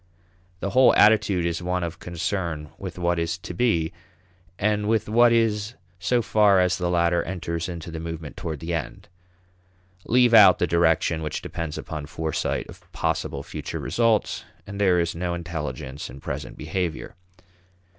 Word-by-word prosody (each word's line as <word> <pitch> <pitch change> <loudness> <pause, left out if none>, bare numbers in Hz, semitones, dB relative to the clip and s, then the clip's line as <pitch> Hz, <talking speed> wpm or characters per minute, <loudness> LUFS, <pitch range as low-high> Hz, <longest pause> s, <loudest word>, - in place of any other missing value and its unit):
The 100 - -2
whole 130 +4 +6
attitude 105 -5 +4
is 85 0 -1
one 90 0 -1
of 85 0 -5
concern 85 -3 -3
with - - -7
what 85 -1 0
is 85 0 -1
to 90 - -8
be, 85 -6 +1 0.6
and 105 0 0
with 110 0 +1
what 120 +2 +5
is 115 -1 +1 0.2
so 120 +5 +1
far 105 -3 +4
as 90 0 +3
the 90 -1 0
latter 85 0 +2
enters 85 -1 -4
into 85 -1 -7
the 80 - -5
movement 80 -2 -6
toward 80 -4 -5
the 85 +1 -3
end. 80 -2 -5 1.0
Leave 125 0 +4
out 95 -5 +8
the - - +1
direction 85 -1 +2
which 75 -1 -4
depends 80 -3 -5
upon 75 -2 -6
foresight 80 0 -2
of - - -15
possible - - -2
future - - -6
results, 115 -2 +1 0.2
and 100 0 -6
there 90 -3 +4
is 85 0 0
no 85 +1 -2
intelligence 80 -5 -5
in 65 +3 -10
present - - -6
behavior. 90 -5 -3
85 Hz, 160 wpm, -24 LUFS, 80-105 Hz, 1.0 s, out